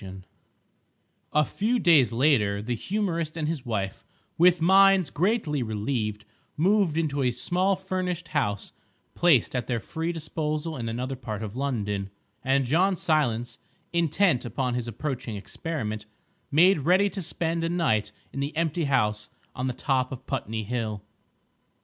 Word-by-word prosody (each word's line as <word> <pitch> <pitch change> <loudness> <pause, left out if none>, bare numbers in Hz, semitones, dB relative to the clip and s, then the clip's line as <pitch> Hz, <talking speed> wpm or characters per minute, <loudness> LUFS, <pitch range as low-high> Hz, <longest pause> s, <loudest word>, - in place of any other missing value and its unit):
II 95 0 -8 1.1
A 150 0 +3
few 225 +5 0
days 160 - +5
later 115 -6 +2
the 115 +4 -3
humorist 170 - -2
and 155 -2 -1
his 150 -5 -3
wife, 100 -4 -3 0.3
with 175 +1 +5
minds 190 -2 +5
greatly 170 - 0
relieved, 110 -1 -2 0.3
moved 185 -1 +3
into 145 -4 0
a 125 - +3
small 180 +10 +1
furnished 185 -2 -3
house 100 -1 -1 0.4
placed 155 -9 +3
at 125 -3 -2
their 120 -2 0
free 160 +9 -3
disposal 155 0 -3
in 115 -3 -4
another 125 +4 -3
part 110 -4 -5
of 105 0 -6
London; 105 -8 -2 0.3
and 135 0 +2
John 180 +9 +3
Silence, 120 -9 0 0.3
intent 170 -2 +2
upon 125 0 -2
his 120 -1 -2
approaching 125 -1 -4
experiment, 110 -2 -5 0.4
made 170 +4 +5
ready 185 +8 +4
to 195 - -5
spend 165 0 -2
a 165 - 0
night 110 -12 +1 0.2
in 135 - -5
the 145 +3 -3
empty 165 0 0
house 105 -6 +1 0.2
on 125 +1 -3
the - - 0
top 130 0 0
of 130 0 -7
Putney 115 -5 -3
Hill. 110 -2 -3
140 Hz, 150 wpm, -26 LUFS, 115-170 Hz, 1.1 s, days